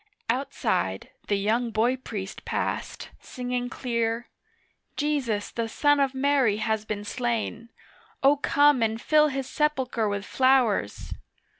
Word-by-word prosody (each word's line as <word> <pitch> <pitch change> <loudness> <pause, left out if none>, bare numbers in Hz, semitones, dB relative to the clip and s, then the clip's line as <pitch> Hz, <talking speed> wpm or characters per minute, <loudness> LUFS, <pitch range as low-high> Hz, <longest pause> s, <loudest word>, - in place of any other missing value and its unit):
Outside 230 - -2 0.2
the 205 - +2
young 220 +4 +1
boy 230 +3 +2
priest 205 -6 -7
passed - - -3
singing 245 -1 -4
clear, 235 -1 -2 0.7
'Jesus 270 -9 -1
the 230 -1 -3
son 290 +4 +3
of 275 -1 +1
Mary 265 -6 +2
has 220 -1 -1
been 210 -1 -4
slain, 230 0 -3 0.5
O 275 +2 +6
come 290 -1 +3
and 225 0 0
fill 305 +4 +4
His 270 -2 -3
sepulchre 260 -7 0
with 200 -1 -3
flowers. 255 - +2
240 Hz, 125 wpm, -26 LUFS, 220-270 Hz, 0.7 s, O